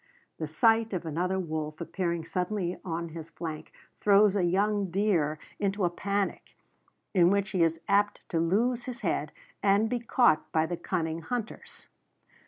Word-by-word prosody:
The 155 Hz, -, -2 dB
sight 225 Hz, +7 st, +3 dB
of 175 Hz, -2 st, -3 dB
another 180 Hz, +4 st, -1 dB
wolf 155 Hz, -3 st, -4 dB
appearing 170 Hz, -1 st, -2 dB
suddenly 180 Hz, -1 st, -2 dB
on 170 Hz, -1 st, -3 dB
his 165 Hz, 0 st, -8 dB
flank 160 Hz, -1 st, -6 dB, 0.3 s
throws 205 Hz, 0 st, +5 dB
a 200 Hz, -, +2 dB
young 200 Hz, +2 st, +1 dB
deer 170 Hz, -5 st, +1 dB, 0.2 s
into 200 Hz, -1 st, 0 dB
a 175 Hz, -, +1 dB
panic, 200 Hz, +2 st, -3 dB, 0.6 s
in 175 Hz, -3 st, +5 dB
which 200 Hz, +1 st, +1 dB
he 185 Hz, -, 0 dB
is 165 Hz, 0 st, +1 dB
apt 205 Hz, +1 st, +2 dB
to 165 Hz, -, 0 dB
lose 230 Hz, +9 st, +1 dB
his 245 Hz, -2 st, -6 dB
head -, -, -1 dB, 0.3 s
and 205 Hz, +3 st, +3 dB
be 245 Hz, -, 0 dB
caught 235 Hz, -, +2 dB
by 160 Hz, 0 st, +2 dB
the 175 Hz, +2 st, -3 dB
cunning 165 Hz, -2 st, -2 dB
hunters. 230 Hz, +6 st, -6 dB
185 Hz, 160 wpm, -29 LUFS, 165-205 Hz, 0.6 s, throws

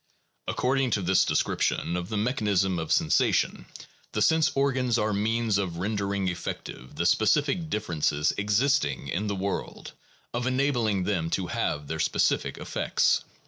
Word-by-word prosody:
According 135 Hz, 0 st, +1 dB
to 100 Hz, -, -4 dB
this 95 Hz, +2 st, +3 dB
description 85 Hz, -, 0 dB
of 90 Hz, 0 st, -4 dB
the 110 Hz, -, -2 dB
mechanism 100 Hz, -5 st, +1 dB
of 80 Hz, -, -4 dB
sensation, -, -, +2 dB, 0.5 s
the -, -, -1 dB
sense 160 Hz, -1 st, +4 dB
organs 130 Hz, -3 st, +1 dB
are 105 Hz, -1 st, 0 dB
means 110 Hz, 0 st, +1 dB
of 90 Hz, -4 st, -3 dB
rendering 100 Hz, 0 st, -1 dB
effective 85 Hz, -7 st, -6 dB
the -, -, -1 dB
specific 150 Hz, -, +2 dB
differences 80 Hz, -, 0 dB
existing 105 Hz, -, +1 dB
in 100 Hz, +10 st, -2 dB
the 100 Hz, -, -1 dB
world, 95 Hz, +1 st, -4 dB, 0.4 s
of 120 Hz, +1 st, -2 dB
enabling 125 Hz, -7 st, +1 dB
them 90 Hz, -5 st, -1 dB
to 95 Hz, +2 st, -1 dB
have 75 Hz, 0 st, -1 dB
their 80 Hz, +2 st, -4 dB
specific -, -, +1 dB
effects. -, -, +1 dB
105 Hz, 140 wpm, -27 LUFS, 90-125 Hz, 0.5 s, sense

